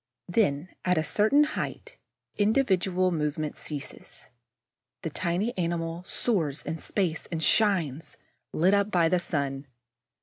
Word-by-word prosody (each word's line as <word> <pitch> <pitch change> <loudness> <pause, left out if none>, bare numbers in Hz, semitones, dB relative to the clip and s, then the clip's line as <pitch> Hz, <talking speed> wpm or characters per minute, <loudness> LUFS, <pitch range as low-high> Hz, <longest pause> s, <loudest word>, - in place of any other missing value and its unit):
Then, 175 -4 +1
at 180 -1 +2
a 160 - +2
certain 215 - +4
height, 300 - -5 0.4
individual 190 -5 +2
movement 150 -1 -2
ceases. 145 -3 -9 0.7
The 160 - -3
tiny 185 +9 -1
animal 170 0 -2
soars 165 - 0
in 160 +2 -4
space 175 -3 -1
and 160 -2 -2
shines, 165 - +1 0.3
lit 180 +5 +3
up 200 0 +2
by 170 -5 +3
the 180 +1 +2
sun. 140 -5 -2
175 Hz, 125 wpm, -27 LUFS, 155-200 Hz, 0.7 s, certain